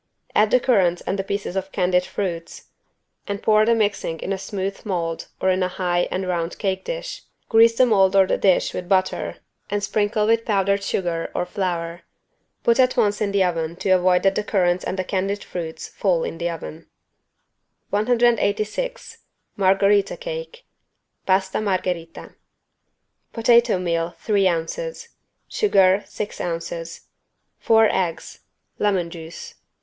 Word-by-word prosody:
Add 210 0 +4
the 250 - +4
currants 190 -9 +2
and 195 - -2
the - - 0
pieces 200 -1 -4
of 190 0 -3
candied 180 -1 +1
fruits 180 -3 -5 0.6
and 200 0 -4
pour 215 0 +4
the 230 - +4
mixing 205 -6 -1
in 195 - -2
a - - -2
smooth 195 0 -4
mold 170 -5 -3
or 190 - +2
in 185 0 0
a 185 - +2
high 175 -1 -1
and 185 0 -3
round 170 -1 -2
cake 190 -2 -2
dish. - - -5 0.3
Grease 230 +1 +5
the 255 - +6
mold 195 -5 +3
or 195 -1 +6
the - - +1
dish 190 -3 +2
with 180 -1 -5
butter 185 -1 0 0.3
and 205 0 -2
sprinkle 210 +1 0
with 230 +1 +2
powdered 200 -2 +1
sugar 175 -4 -2
or - - 0
flour. 175 -2 -3 0.6
Put 235 +2 +3
at 255 0 +3
once 205 -3 +2
in 205 -2 0
the 200 -1 +3
oven 165 -2 -1
to 190 - -1
avoid 180 -1 +4
that 195 - +4
the 210 - -1
currants 180 -4 +1
and 190 - -3
the 185 - 0
candied 195 +2 -2
fruits 165 -3 -6
fall 180 -5 0
in 165 - -5
the 170 0 -1
oven. 165 -1 -8 1.0
186 230 - 0 0.4
MARGHERITA 195 +1 +3
CAKE - - -7 0.6
(Pasta 190 +1 +1
Margherita) 180 -4 -3 1.0
Potato 235 -2 +4
meal, 170 -1 -2
three 200 -3 +2
ounces. 465 - -3 0.4
Sugar, 195 - +3
six 210 - -5
ounces. 165 -1 -5 0.6
Four 225 -1 +5
eggs. 175 -3 -3 0.4
Lemon 190 -5 0
juice. 165 -1 -9
195 Hz, 150 wpm, -22 LUFS, 180-210 Hz, 1.0 s, the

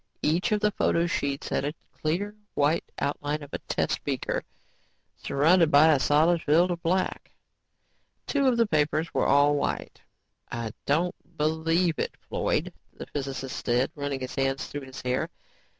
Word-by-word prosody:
Each 170 +8 +1
of 210 -1 +2
the 210 -1 +3
photo 170 -3 +1
sheets 140 -5 -2
had - - 0
a 145 +3 -2 0.2
clear, 180 +7 -2 0.2
white 150 +3 +1
outline 145 +1 -2
of 145 - -12
a - - -2
test - - -2
beaker - - -2 0.7
surrounded 165 +4 +3
by 155 +2 +7
a 140 - +2
solid 160 +5 +3
field 170 +5 +3
of 170 -1 -3
black. 185 +3 -1 1.0
Two 280 -2 +1
of 250 -2 +3
the 230 - +4
papers 155 -2 0
were - - +2
all 145 +1 +5
white. 145 - -2 0.5
"I 115 -2 -3 0.2
don't 165 +5 +2 0.2
believe 160 +2 +1
it, - - -2
Floyd," - - -1 0.2
the - - -9
physicist 135 -2 -5
said, 125 +2 +1
running 140 -2 -3
his 130 - -5
hands 135 0 0
through 145 - -6
his 130 - -9
hair. 125 0 0
150 Hz, 160 wpm, -27 LUFS, 140-170 Hz, 1.0 s, by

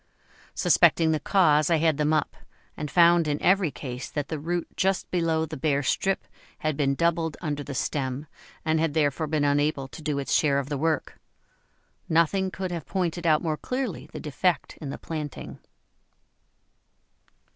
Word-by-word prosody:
Suspecting 160 -1 +4
the 155 - +1
cause, 155 -2 +3
I 170 - +4
had 160 -2 +2
them 150 0 +1
up, 155 -1 0 0.4
and 150 -1 -5
found 170 +1 +5
in 145 -1 0
every 190 -2 +3
case 125 -1 -7
that 145 -2 -4
the 155 - -3
root 170 +3 -2
just 190 0 0
below 165 -2 +1
the 155 0 -7
bare 140 0 +1
strip 195 +8 0 0.3
had 155 -3 -1
been 140 -1 +1
doubled 165 0 0
under 145 -4 -3
the 140 -1 -7
stem, 135 +1 -2 0.4
and 160 0 +2
had 160 -1 0
therefore 155 0 +1
been 150 -1 0
unable 145 -1 +1
to 130 - -10
do 150 -2 -2
its 140 - -2
share 140 -3 +3
of 140 0 -2
the 145 - -2
work. 160 +1 -1 0.9
Nothing 170 +4 +2
could 185 -1 -5
have 170 -4 -5
pointed 175 -2 -1
out 155 0 +3
more 155 -2 -1
clearly 250 - -4
the - - -7
defect 160 +3 -1
in 145 - -5
the - - -5
planting. 150 -3 -6
155 Hz, 170 wpm, -26 LUFS, 145-170 Hz, 0.9 s, found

